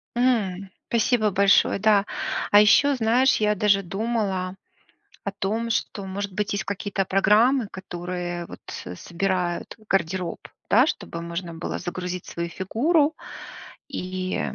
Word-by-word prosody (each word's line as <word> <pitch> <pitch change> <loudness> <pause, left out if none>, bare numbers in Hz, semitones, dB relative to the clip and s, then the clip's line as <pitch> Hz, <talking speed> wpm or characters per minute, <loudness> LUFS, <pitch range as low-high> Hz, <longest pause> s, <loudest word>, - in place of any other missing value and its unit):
М, 205 -7 +1 0.2
спасибо 225 -2 +2
большое, 200 +1 +4
да. 205 -1 +4 0.5
А 205 - +8
ещё, 280 +7 +5
знаешь, 250 +2 +3
я 210 0 +3
даже 200 0 +3
думала 195 -1 -2 0.7
о 200 - -1
том, 220 +4 -2
что 205 -2 -2
может 200 +1 -4
быть 205 +2 -2
есть 200 -1 -2
какие-то 200 0 -2
программы, 210 +6 +3
которые, 175 -1 -5
вот - - -11 0.4
собирают 180 -1 -2
гардероб, 180 -1 -1 0.3
да, 250 +6 +6
чтобы 190 - -4
можно 170 0 -5
было 165 - -4
загрузить 180 0 -5
свою 170 0 -4
фигуру 285 - +1 0.7
и, 185 0 -3
195 Hz, 125 wpm, -24 LUFS, 180-220 Hz, 0.7 s, А